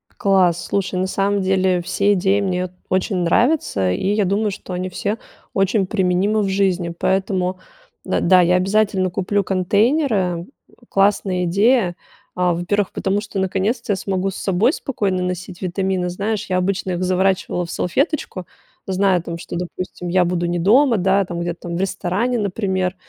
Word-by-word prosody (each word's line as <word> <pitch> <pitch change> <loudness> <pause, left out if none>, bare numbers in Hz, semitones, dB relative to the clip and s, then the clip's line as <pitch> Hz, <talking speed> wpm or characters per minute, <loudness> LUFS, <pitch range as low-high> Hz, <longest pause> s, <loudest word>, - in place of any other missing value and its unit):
Класс! 185 -3 +2
Слушай, 195 -2 -1
на 185 - 0
самом 200 +1 0
деле 185 -1 +2
все 200 +3 +1
идеи 195 +1 +2
мне 185 -2 -1
вот 185 - -6 0.2
очень 185 +1 0
нравятся, 175 - +2
и 140 - -1
я 210 -1 +2
думаю, 205 +3 0
что 190 -1 -8
они 185 +1 -3
все 205 +4 -2 0.4
очень 195 +1 +2
применимы 190 +2 +1
в 195 - 0
жизни, 185 -3 0
поэтому, 185 -1 0 0.5
э, - - 0
да, 185 +1 +5
я 180 +1 +3
обязательно 190 -1 +1
куплю 200 +2 0
контейнеры. 195 - +1 0.2
К 240 - -25
классная 195 -2 +2
идея, 200 0 +2 0.4
а, 180 -1 +2
во-первых, 185 +4 -1
потому 195 +2 -1
что 205 -2 -5
наконец-то 195 +5 -1
я - - 0
смогу 190 0 -2
с - - -9
собой 205 - +1
спокойно 195 -8 -2
носить 180 0 -5
витамины. 185 0 -1
Знаешь, 205 +4 -3
я 185 - +1
обычно 190 0 -1
их 180 0 -2
заворачивала 185 -1 +1
в 170 - -8
салфеточку, 265 - -1 0.4
зная, 190 -2 +2
там, 170 -1 -6
что, 170 - -7
допустим, 180 0 -5
я 180 0 +3
буду 175 0 -1
не 175 0 -1
дома, 235 +6 +4
да, 195 +1 +2
там, 175 -1 -5
где-то 175 0 -4
там 170 -1 -5
в - - -3
ресторане, 195 +6 -1
например, 190 -2 -1
190 Hz, 170 wpm, -20 LUFS, 180-200 Hz, 0.5 s, да